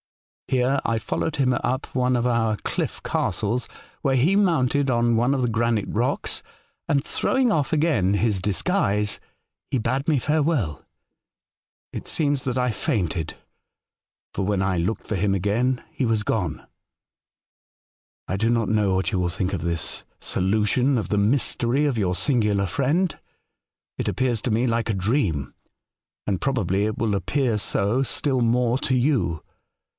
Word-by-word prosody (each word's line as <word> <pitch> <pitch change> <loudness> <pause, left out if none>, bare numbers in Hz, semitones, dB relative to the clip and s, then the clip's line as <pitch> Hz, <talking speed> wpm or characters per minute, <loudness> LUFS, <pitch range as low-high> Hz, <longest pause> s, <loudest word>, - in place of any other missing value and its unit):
Here 130 +1 +1
I 115 - 0
followed 150 +6 -2
him 130 -2 +2
up 130 +2 -1
one 125 0 +2
of 120 0 0
our 115 -3 +1
cliff - - -3
castles, 115 +5 -1 0.3
where 135 -2 +2
he 160 +10 +3
mounted 145 -8 +2
on 120 -1 +2
one 120 +4 +2
of 135 -2 0
the - - +2
granite 115 -2 +1
rocks, - - -2 0.5
and, 140 0 +2
throwing 260 -3 +1
off 150 -8 0
again 145 - +2
his 100 -2 +1
dis 95 -2 -1
guise, 105 - +1 0.5
he - - 0
bade 130 +5 -1
me 150 - +3
farewell. 145 - 0 1.1
It - - -6
seems 145 -4 0
that 125 -1 -1
I 125 -1 +1
fainted, 85 -6 -2 1.0
for 95 - -2
when 100 0 0
I 95 -1 +1
looked 90 +7 -2
for 110 - -1
him 100 +1 +1
again 115 +7 0
he - - -3
was 110 -3 +1
gone. 90 -8 -2 1.6
"I 95 - -1
do 110 +4 +1
not 115 -2 +1
know 105 -3 +2
what 95 +4 0
you 95 - 0
will 90 -1 +1
think 95 +2 -2
of 90 - -2
this 85 -1 -2 0.2
solution 110 +8 +1
of 110 - -3
the 105 - +1
mystery 120 +4 +1
of 140 -5 0
your 90 -3 +1
singular 105 -6 +1
friend. 145 - 0 0.8
It - - -1
appears 125 -4 0
to 120 - -1
me 115 +4 +2
like 115 0 0
a - - +2
dream, 95 - 0 0.7
and 95 -3 -1
probably 105 -7 +1
it 110 0 -2
will 110 -2 0
appear 115 - 0
so 100 +4 +1
still 135 -1 0
more 120 +1 +2
to 130 - 0
you. 125 - +1
115 Hz, 160 wpm, -24 LUFS, 100-130 Hz, 1.6 s, he